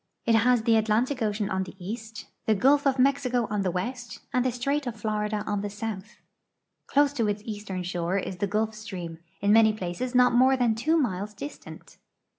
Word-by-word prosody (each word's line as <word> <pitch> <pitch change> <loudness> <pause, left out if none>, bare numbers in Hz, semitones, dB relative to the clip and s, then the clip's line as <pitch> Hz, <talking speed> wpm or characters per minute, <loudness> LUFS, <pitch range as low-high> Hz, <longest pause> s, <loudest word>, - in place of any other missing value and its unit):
It 230 - +3
has 230 +1 +4
the 225 0 +4
Atlantic 230 +5 +1
ocean 210 -1 -1
on 190 0 0
the 190 0 -7
east, 220 +3 -7 0.2
the 220 - +4
gulf 280 +7 +4
of 270 - +3
iMexico 255 -2 +2
on 210 -1 0
the 190 - 0
west, 240 +7 -4
and 250 -1 +2
the 255 - +1
strait 275 +4 -1
of 240 - -3
Florida 210 -1 -2
on 205 -1 -1
the 205 - -3
south. 210 0 -6 0.7
Close 285 0 +3
to 230 -6 0
its 205 0 -2
eastern 205 -4 -5
shore 175 +1 -1
is 190 -1 -4
the 200 - -1
Gulf 215 +2 0
stream, 185 -6 -7 0.2
in 200 +1 +4
many 220 -1 +6
])laces 215 +8 -4
not 250 -1 +5
more 260 +2 +5
than 240 -3 +2
two 305 +10 +1
miles 210 - -1
distant. 285 +9 -10
220 Hz, 200 wpm, -27 LUFS, 205-250 Hz, 0.7 s, many